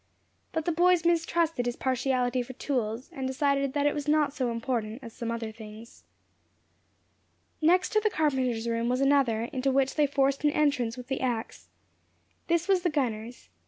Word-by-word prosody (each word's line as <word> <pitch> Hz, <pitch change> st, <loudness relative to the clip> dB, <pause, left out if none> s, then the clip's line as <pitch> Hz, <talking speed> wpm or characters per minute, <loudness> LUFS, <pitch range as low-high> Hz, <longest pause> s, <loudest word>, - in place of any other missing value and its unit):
But 320 Hz, -1 st, -2 dB
the 345 Hz, -, +1 dB
boys 350 Hz, +1 st, +3 dB
mistrusted 330 Hz, -5 st, +1 dB
his 240 Hz, -, -2 dB
partiality 255 Hz, -1 st, 0 dB
for 245 Hz, +1 st, -7 dB
tools, 245 Hz, -3 st, -3 dB
and 265 Hz, -1 st, -3 dB
decided 275 Hz, 0 st, 0 dB
that 290 Hz, -1 st, 0 dB
it 290 Hz, -, +3 dB
was 295 Hz, 0 st, -4 dB
not 295 Hz, -2 st, +2 dB
so 255 Hz, -4 st, -1 dB
important 230 Hz, 0 st, -3 dB
as 230 Hz, -2 st, -9 dB
some 235 Hz, -, -5 dB
other 230 Hz, -1 st, -3 dB
things. 220 Hz, +1 st, -12 dB, 1.6 s
Next 360 Hz, +3 st, +4 dB
to 430 Hz, -, +3 dB
the 430 Hz, 0 st, +1 dB
carpenter's 260 Hz, -, 0 dB
room 230 Hz, 0 st, 0 dB
was 250 Hz, +1 st, +1 dB
another, 270 Hz, -5 st, +3 dB
into 265 Hz, +1 st, 0 dB
which 270 Hz, 0 st, +2 dB
they 300 Hz, -2 st, +2 dB
forced 275 Hz, 0 st, +1 dB
an 295 Hz, -, +5 dB
entrance 260 Hz, -6 st, +1 dB
with 250 Hz, -, -8 dB
the 265 Hz, +1 st, -3 dB
ax. 240 Hz, -3 st, -3 dB, 0.8 s
This 340 Hz, 0 st, +1 dB
was 385 Hz, -2 st, +3 dB
the 350 Hz, -, +1 dB
gunner's. 245 Hz, -5 st, -3 dB
265 Hz, 175 wpm, -28 LUFS, 235-300 Hz, 1.6 s, an